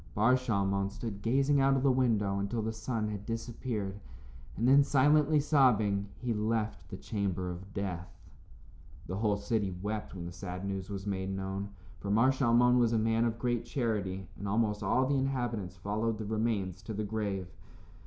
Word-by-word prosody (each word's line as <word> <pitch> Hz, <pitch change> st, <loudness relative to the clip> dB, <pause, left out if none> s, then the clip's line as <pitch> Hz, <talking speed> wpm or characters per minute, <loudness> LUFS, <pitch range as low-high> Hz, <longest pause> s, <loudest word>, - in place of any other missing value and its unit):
Bar 110 Hz, +5 st, +4 dB
Shalmon 100 Hz, -5 st, 0 dB
stood 105 Hz, -1 st, -6 dB
gazing 135 Hz, +5 st, +3 dB
out 135 Hz, 0 st, +4 dB
of 130 Hz, -, -1 dB
the 140 Hz, -, +5 dB
window 110 Hz, -6 st, +1 dB
until 105 Hz, +3 st, -2 dB
the 110 Hz, +1 st, -2 dB
sun 110 Hz, -1 st, -2 dB
had 105 Hz, -2 st, -5 dB
disappeared, 115 Hz, -3 st, -4 dB, 0.6 s
and 115 Hz, +5 st, +1 dB
then, 140 Hz, +2 st, +7 dB
silently 150 Hz, +2 st, +4 dB
sobbing, 110 Hz, -9 st, +3 dB
he 125 Hz, -1 st, -2 dB
left 110 Hz, 0 st, -2 dB
the 95 Hz, -, -6 dB
chamber 95 Hz, -4 st, -2 dB
of 95 Hz, +3 st, -9 dB
death. 90 Hz, -4 st, -4 dB, 1.0 s
The 95 Hz, -, -4 dB
whole 105 Hz, -1 st, +1 dB
city 105 Hz, -1 st, 0 dB
wept 105 Hz, +1 st, -4 dB
when 85 Hz, -2 st, -6 dB
the 85 Hz, -, -6 dB
sad 90 Hz, +1 st, -6 dB
news 95 Hz, -1 st, -4 dB
was 100 Hz, -1 st, -5 dB
made 95 Hz, -1 st, -2 dB
known, 95 Hz, +1 st, -3 dB, 0.3 s
for 100 Hz, -, -5 dB
Mar 115 Hz, +6 st, +5 dB
Shalmon 125 Hz, -1 st, +4 dB
was 120 Hz, -1 st, +3 dB
a -, -, +3 dB
man 115 Hz, +1 st, +2 dB
of 115 Hz, -1 st, -1 dB
great 120 Hz, -1 st, 0 dB
charity, 100 Hz, -, -2 dB
and 100 Hz, -, -4 dB
almost 105 Hz, 0 st, +1 dB
all 115 Hz, +6 st, +2 dB
the 140 Hz, 0 st, +1 dB
inhabitants 120 Hz, -8 st, -2 dB
followed 110 Hz, +4 st, -1 dB
the 110 Hz, -, -5 dB
remains 105 Hz, -4 st, -1 dB
to 105 Hz, +1 st, -6 dB
the 105 Hz, -, -2 dB
grave. 100 Hz, -4 st, -2 dB
110 Hz, 180 wpm, -31 LUFS, 100-120 Hz, 1.0 s, then